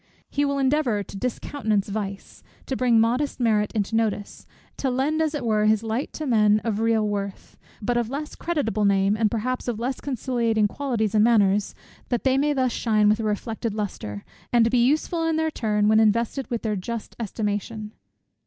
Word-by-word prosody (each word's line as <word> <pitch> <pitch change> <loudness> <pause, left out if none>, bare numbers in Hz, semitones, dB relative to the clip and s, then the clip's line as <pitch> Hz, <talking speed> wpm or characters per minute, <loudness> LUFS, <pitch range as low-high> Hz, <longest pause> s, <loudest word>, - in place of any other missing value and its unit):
He 285 - +1
will 280 0 0
endeavour 265 -6 +1
to 195 - -12
discountenance 220 -2 -1
vice, 200 -1 -5 0.2
to 265 - -2
bring 245 -3 +3
modest 245 +7 +1
merit 215 -3 +2
into 215 0 -1
notice; 215 -2 -2 0.3
to 270 - -1
lend 275 +5 0
as 315 -1 0
it 285 - -3
were 215 -2 +2
his 215 0 +3
light 225 +5 -2
to 310 - -5
men 215 -4 +4
of 220 -3 -1
real 225 -1 +2
worth, 200 -1 -4 0.3
but 240 +3 +1
of 235 -2 0
less 295 +3 -5
creditable 265 - -1
name, 200 0 +3
and 215 -1 +2
perhaps 250 +4 -2
of 235 -3 -2
less 250 +2 -3
conciliating 235 -5 0
qualities 230 -4 -2
and 215 -1 +4
manners; 205 -3 +3 0.3
that 245 - -1
they 265 -1 +3
may 295 +1 +2
thus 260 -3 +1
shine 215 -3 +2
with 215 +2 +2
a - - -2
reflected 215 +1 -2
lustre, 105 - -5 0.3
and 230 -1 +4
be 245 -1 +4
useful 310 +5 +1
in 325 -1 +1
their 320 0 0
turn, 210 -5 0
when 220 +1 +5
invested 230 +5 +1
with 235 -3 -3
their 215 -2 0
just 225 +4 -5
estimation. 210 0 -3
225 Hz, 190 wpm, -24 LUFS, 210-255 Hz, 0.3 s, when